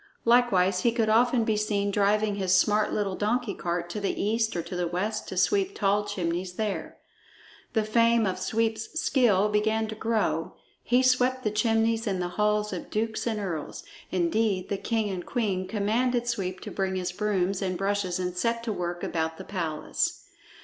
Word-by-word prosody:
Likewise 195 -6 +4
he 235 - +3
could 225 -2 +1
often 240 +2 +4
be 220 -1 +1
seen 205 -1 0
driving 210 +1 +2
his 190 -2 +2
smart 210 +2 +2
little 200 -3 -1
donkey 220 +1 0
cart 170 -1 -3
to 210 - -3
the 200 - -2
east 220 +2 0
or 170 - -1
to 180 - -7
the 180 -1 -1
west 205 +5 -2
to 185 - -6
sweep 390 - +2
tall 205 0 +1
chimneys 180 -2 -3
there. 210 +1 -3 0.8
The 220 - +2
fame 230 +1 +3
of 185 -1 -2
Sweep's 220 +8 -1
skill 210 - +3
began 220 +1 +1
to - - -4
grow; 220 0 -1 0.3
he 250 +1 +2
swept 255 0 +2
the 215 - 0
chimneys 225 +1 +1
in 190 -2 0
the 175 0 -2
halls 210 +2 0
of 180 - -6
dukes 220 +2 -2
and 220 -2 -1
earls. 170 -7 -4 0.3
Indeed, 185 +2 0
the 200 - -1
king 220 0 -1
and 180 -2 -4
queen 195 -6 -1
commanded 235 +5 0
Sweep 190 -6 -2
to - - -7
bring 190 -1 -1
his 180 -1 -2
brooms 195 -1 0
and 185 -2 -1
brushes 195 -2 -1
and 180 -1 -3
set 230 +4 0
to 225 -2 -2
work 175 -2 -4
about 160 -1 -2
the - - -7
palace. 165 -6 -2
210 Hz, 185 wpm, -27 LUFS, 185-225 Hz, 0.8 s, Likewise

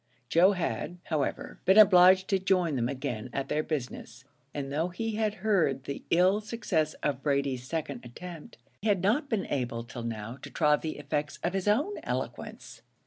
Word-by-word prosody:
Joe 185 +4 +5
had, 180 -1 -3
however, 150 -4 -3
been 190 +3 +5
obliged 185 -2 +7
to 195 -2 +2
join 180 -5 +1
them 120 -1 0
again 130 -4 -4
at 135 - -3
their 150 - +1
business, 130 -4 -5 0.3
and 140 -1 -5
though 160 +4 +1
he 225 +6 -3
had 215 -1 0
heard 160 -11 +2
the 140 - -5
ill 185 +4 +4
success 195 -8 -1
of 140 -3 -1
Brady's 140 -3 -1
second 145 -6 -4
attempt, 165 +6 -10 0.2
he 215 - -2
had 195 -4 +2
not 260 +9 +1
been 215 -5 0
able 120 -4 -2
till 120 0 -8
now 115 +1 -5
to - - -8
try 150 -2 +3
the 155 +1 -5
effects 145 +1 -3
of 180 - 0
his 195 0 -2
own 290 - +1
eloquence. - - -5
155 Hz, 180 wpm, -29 LUFS, 135-190 Hz, 0.3 s, obliged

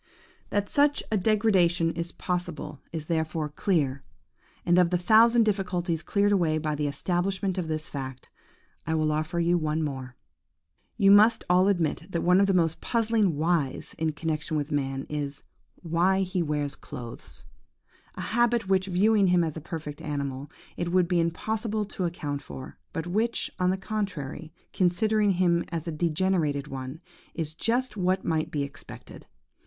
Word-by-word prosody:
– - - -32
"That 205 0 0
such 290 +4 +2
a - - +2
degeneration 185 -5 +3
is 170 +1 -4
possible 175 -5 -4
is 160 -2 -5
therefore 160 -1 -1
clear; 145 -5 0 0.6
and 175 +1 +4
of 180 -2 +4
the 180 - +2
thousand 225 +6 +5
difficulties 180 -5 -1
cleared 205 +2 +1
away 170 -6 +2
by 155 -1 -1
the 150 0 -1
establishment 185 +5 -1
of 170 - -3
this 155 -1 -2
fact, 130 -2 -7 0.6
I 160 - +1
will 155 -1 +1
offer 155 +3 -1
you 170 +1 +2
one 155 0 -1
more. 130 -4 -5 0.8
"You 200 -3 +5
must 215 +3 +6
all 185 +2 +5
admit 170 -3 0
that 170 - -1
one 180 +2 +5
of 200 - +4
the 195 - +2
most 165 -2 +1
puzzling 220 -8 +1
whys 160 -3 0
in 160 -1 0
connexion 155 0 -2
with 150 +1 -3
man 135 -2 -1
is, 145 -2 -4 0.4
why 175 +3 +2
he 185 -1 -1
wears 150 -2 -1
clothes? 120 -5 -9 0.7
A - - -6
habit 240 -2 +1
which, 190 0 +2
viewing 200 +2 +3
him 180 -1 +4
as 160 -2 -3
a 160 - -6
perfect 155 -2 -6
animal, 140 -3 -4 0.3
it 175 0 -2
would 180 -1 +3
be 180 -1 +2
impossible 215 +6 -1
to 190 -2 -4
account 145 -5 -3
for, 130 -1 -10
but 165 -4 -4
which, 220 +6 -1
on 180 0 +2
the 190 - +1
contrary, 185 -7 -4 0.2
considering 205 +3 +2
him 175 -1 +2
as 165 -1 -4
a - - -1
degenerated 155 -3 0
one, 135 +2 -6 0.3
is 160 -2 -3
just 235 +7 0
what 185 -1 0
might 160 -1 0
be 145 -2 -1
expected. 140 0 -10
170 Hz, 165 wpm, -27 LUFS, 155-195 Hz, 0.8 s, must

